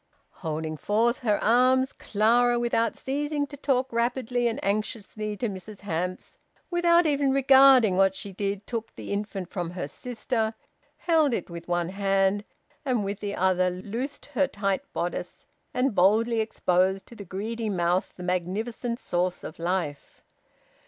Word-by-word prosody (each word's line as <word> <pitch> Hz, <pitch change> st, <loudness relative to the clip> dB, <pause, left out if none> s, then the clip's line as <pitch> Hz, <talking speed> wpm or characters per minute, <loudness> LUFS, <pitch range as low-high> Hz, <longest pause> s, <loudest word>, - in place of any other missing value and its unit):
Holding 155 Hz, -1 st, -3 dB
forth 225 Hz, -, +1 dB
her 215 Hz, -4 st, +1 dB
arms, 255 Hz, +3 st, +4 dB
Clara, 240 Hz, +3 st, +2 dB
without 235 Hz, -1 st, 0 dB
ceasing 290 Hz, +2 st, -1 dB
to 285 Hz, -, -10 dB
talk 265 Hz, -3 st, 0 dB
rapidly 240 Hz, +1 st, 0 dB
and 235 Hz, +4 st, -2 dB
anxiously 215 Hz, 0 st, -2 dB
to 235 Hz, -, -1 dB
Mrs 200 Hz, +1 st, -8 dB
Hamps, 180 Hz, -1 st, -4 dB, 0.3 s
without 345 Hz, 0 st, +4 dB
even 285 Hz, -2 st, +2 dB
regarding 265 Hz, -6 st, +6 dB
what 195 Hz, 0 st, +4 dB
she 200 Hz, -, -5 dB
did, 200 Hz, +1 st, -3 dB
took 230 Hz, -2 st, -5 dB
the -, -, -5 dB
infant 200 Hz, -3 st, -4 dB
from 175 Hz, -3 st, -3 dB
her 180 Hz, -4 st, -4 dB
sister, 225 Hz, -, -3 dB, 0.4 s
held 315 Hz, -7 st, +3 dB
it -, -, -5 dB
with 170 Hz, 0 st, -8 dB
one 175 Hz, -1 st, 0 dB
hand, 195 Hz, +1 st, +1 dB, 0.4 s
and 250 Hz, -7 st, 0 dB
with 200 Hz, +1 st, -3 dB
the 205 Hz, -1 st, -3 dB
other 185 Hz, 0 st, +2 dB
loosed 225 Hz, +10 st, -5 dB
her 280 Hz, +1 st, +3 dB
tight 195 Hz, -6 st, -1 dB
bodice, 175 Hz, +1 st, -4 dB, 0.3 s
and 250 Hz, 0 st, +1 dB
boldly 220 Hz, +5 st, +3 dB
exposed 190 Hz, -3 st, +1 dB
to 235 Hz, -, -14 dB
the 205 Hz, -, -8 dB
greedy 215 Hz, +4 st, -4 dB
mouth 180 Hz, -1 st, +1 dB
the 180 Hz, -, -9 dB
magnificent 205 Hz, +7 st, -2 dB
source 180 Hz, +1 st, -1 dB
of 155 Hz, -, -8 dB
life. 170 Hz, -4 st, -3 dB
210 Hz, 150 wpm, -26 LUFS, 185-245 Hz, 0.4 s, regarding